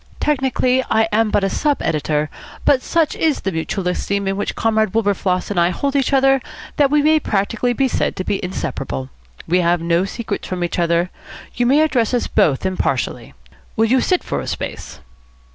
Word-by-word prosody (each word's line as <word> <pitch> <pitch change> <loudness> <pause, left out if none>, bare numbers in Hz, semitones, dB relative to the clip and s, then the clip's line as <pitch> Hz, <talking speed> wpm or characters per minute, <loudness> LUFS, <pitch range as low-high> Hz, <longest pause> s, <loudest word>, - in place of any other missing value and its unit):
Technically, 260 -3 +1
I 220 0 +3
am 220 +1 +2
but 205 - +1
a 195 - +2
sub 295 -1 0
editor; 150 0 -1 0.3
but 265 -2 +4
such 330 0 0
is 315 -3 +1
the 195 - -2
mutual 180 +3 -3
esteem 200 +2 -1
in 195 - 0
which 205 - -3
Comrade 220 -2 +1
Windsor 200 -3 0
and 180 - 0
I 170 0 +4
hold 275 +10 -2
each 275 -1 +1
other 270 0 +4 0.4
that 285 -2 +4
we 295 0 +3
may 310 +1 +4
practically 220 +2 0
be 270 +2 +1
said - - -1
to 185 - -3
be 195 - -2
inseparable. 65 - -4 0.4
We 180 +2 +3
have 175 0 +2
no 170 +2 +1
secrets 220 0 -5
from 180 -1 -3
each 175 - -2
other. 170 +1 +1 0.4
You 240 0 0
may 280 +4 +4
address 250 -6 +1
us 245 - 0
both 140 +3 +1
impartially. 130 - -2 0.4
Will 225 - +3
you 255 +3 +3
sit 365 -2 +1
for - - -3
a - - -6
space?" - - -6
210 Hz, 195 wpm, -19 LUFS, 180-265 Hz, 0.4 s, but